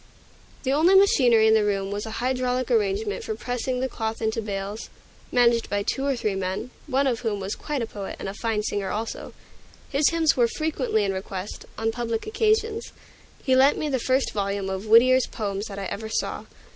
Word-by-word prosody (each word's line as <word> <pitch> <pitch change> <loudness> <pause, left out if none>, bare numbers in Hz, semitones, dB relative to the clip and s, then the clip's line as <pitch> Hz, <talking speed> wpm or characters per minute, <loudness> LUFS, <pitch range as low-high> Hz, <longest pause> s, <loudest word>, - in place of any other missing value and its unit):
The 265 -1 +1
only 335 +6 +5
machinery 250 - +5
in 220 - +5
the 220 -1 +4
room 195 -1 -1
was 205 +2 -3
a 220 - -5
hydraulic 255 0 -1
arrangement 425 0 0
for 440 -1 -3
pressing 250 - -3
the 260 - +1
cloth 225 -3 -4
into 220 0 -1
bales, 200 0 -5 0.4
managed 235 -1 +3
by 205 0 0
two 270 +6 -1
or 275 - +1
three 215 -4 -1
men, 190 +5 -3 0.2
one 275 0 +1
of 245 -4 +1
whom 220 -5 -2
was 195 +2 -3
quite 290 -5 -3
a - - -1
poet, 205 -3 -7
and - - -6
a 195 - -4
fine 215 0 -1
singer 205 -2 -2
also. 225 +2 -4 0.6
His 285 +1 +3
hymns 325 -2 +2
were 240 -2 +4
frequently 265 -6 -1
in 195 -1 0
request, 190 +1 -6
on 225 0 0
public 230 -1 -3
occasions. 440 +1 0 0.5
He 260 -2 +3
lent 270 +2 +5
me 305 - -2
the 265 -2 0
first 260 +3 +1
volume 200 -1 -2
of 190 +3 -4
Whittier's 250 +3 +6
poems 205 -1 -4
that 195 - -8
I 195 - -4
ever 220 +3 -5
saw. - - -2
230 Hz, 200 wpm, -25 LUFS, 205-270 Hz, 0.6 s, Whittier's